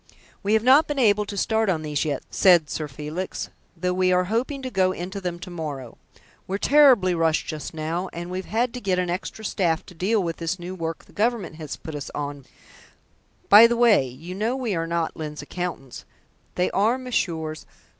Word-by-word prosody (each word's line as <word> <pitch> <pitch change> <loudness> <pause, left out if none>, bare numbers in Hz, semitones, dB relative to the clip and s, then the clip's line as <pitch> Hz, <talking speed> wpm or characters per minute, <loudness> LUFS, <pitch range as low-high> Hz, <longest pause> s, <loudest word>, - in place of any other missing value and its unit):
"We 205 +1 0
have 220 0 +3
not 270 +5 +6
been 295 - -3
able 210 -5 +3
to 200 - -6
start 220 +1 +1
on 160 -4 0
these 150 0 -1
yet," 145 -3 -2
said 175 -5 +4
Sir 155 - -3
Felix, 150 +6 -5 0.3
"though 180 +2 -1
we 185 0 +2
are 180 0 +3
hoping 265 +4 -1
to 255 - -4
go 185 -3 +2
into 190 +3 -6
them 175 -2 -3
to 180 +1 -9
morrow. 145 -8 -6 0.5
We're 195 - -1
terribly 255 -8 +5
rushed 165 -2 +1
just 155 0 -6
now, 165 +4 -3
and 175 +1 -6
we've 185 +1 -4
had 230 +2 0
to 250 - -6
get 190 -3 0
in 180 - +2
an 180 - -4
extra 190 +4 -5
staff 170 -5 0
to - - -13
deal 195 +5 +1
with 165 -1 -3
this 165 +2 -2
new 175 +1 -7
work 165 -3 -5
the - - -21
Government 215 -7 -1
has 155 -3 -6
put 160 - -9 0.2
on 145 -1 -4
us 135 - -19 1.0
by 215 +3 +9
the 235 0 -1
way, 230 - +5
you 150 +9 -9
know 215 +5 -1
that 265 - -5
we 225 -5 -1
are 165 -1 -1
not 170 -1 -1
Lyne's 150 -2 -6
accountants; 165 -5 -6 0.5
they 180 - +1
are 220 +6 +2
Messrs. 165 -11 -3
180 Hz, 210 wpm, -24 LUFS, 160-215 Hz, 1.0 s, by